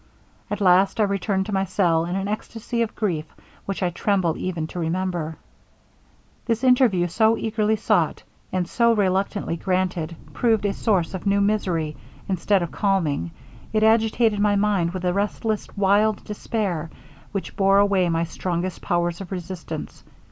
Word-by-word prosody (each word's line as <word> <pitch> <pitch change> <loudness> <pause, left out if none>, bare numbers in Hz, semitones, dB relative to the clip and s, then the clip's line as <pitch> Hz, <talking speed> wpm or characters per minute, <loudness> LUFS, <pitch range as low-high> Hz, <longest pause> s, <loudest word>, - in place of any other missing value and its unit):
At 205 0 -3
last 190 +2 +4
I - - +5
returned 195 -1 0
to 210 - -5
my 190 0 +2
cell 170 -3 +2
in 175 +2 -3
an 195 0 -2
ecstasy 225 +3 -3
of 230 - -2
grief 170 -8 -1 0.4
which 195 -1 -2
I 180 - +1
tremble 180 -3 +1
even 175 -4 -3
to 180 - -6
remember. 170 -2 -2 1.1
'This 230 +1 0
interview, 250 -8 +4
so 220 +6 +2
eagerly 220 -1 0
sought, 215 - +1 0.3
and 180 -2 -1
so 235 +4 +3
reluctantly 195 -3 0
granted, 180 -2 -1 0.2
proved 225 -4 +2
a 200 - +1
source 195 -7 0
of 190 +2 -5
new 200 0 +3
misery 185 -7 0 0.3
instead 190 0 +1
of 170 - -5
calming, 165 - 0 0.4
it 215 0 +2
agitated 220 -1 +3
my 205 0 +3
mind 200 -4 +2
with 185 0 -5
a 180 - +2
restless, 210 +2 -1
wild 205 +2 +3
despair, 200 -6 -3 0.4
which 195 -2 -5
bore 195 0 +4
away 200 -3 +3
my 165 0 +1
strongest 175 +2 -3
powers 175 +1 -1
of 195 - -9
resistance. 175 -3 -6
195 Hz, 155 wpm, -23 LUFS, 175-210 Hz, 1.1 s, I